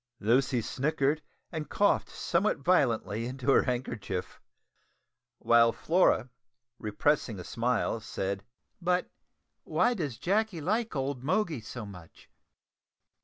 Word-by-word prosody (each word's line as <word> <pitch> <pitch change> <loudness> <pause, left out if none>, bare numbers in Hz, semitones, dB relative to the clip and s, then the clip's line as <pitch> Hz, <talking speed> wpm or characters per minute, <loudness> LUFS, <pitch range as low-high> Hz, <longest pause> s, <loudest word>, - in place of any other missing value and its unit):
Lucy 125 +3 +2
snickered 145 +4 0 0.3
and 155 -4 -5
coughed 205 - +2
somewhat 190 +5 0
violently 120 - +1
into 130 +2 -1
her - - +6
handkerchief; 110 -7 -4 1.0
while 115 0 +5
Flora, 160 -6 +2 0.5
repressing 110 0 0
a - - -6
smile, 115 +2 0
said 100 -2 -3 0.4
"But 180 +1 0 0.5
why 245 - +2
does 150 - -3
Jacky 200 - 0
like 215 +5 -1
old 135 -2 -2
Moggy 160 - 0
so 110 +1 -7
much?" 90 -5 -13
130 Hz, 110 wpm, -29 LUFS, 115-165 Hz, 1.0 s, her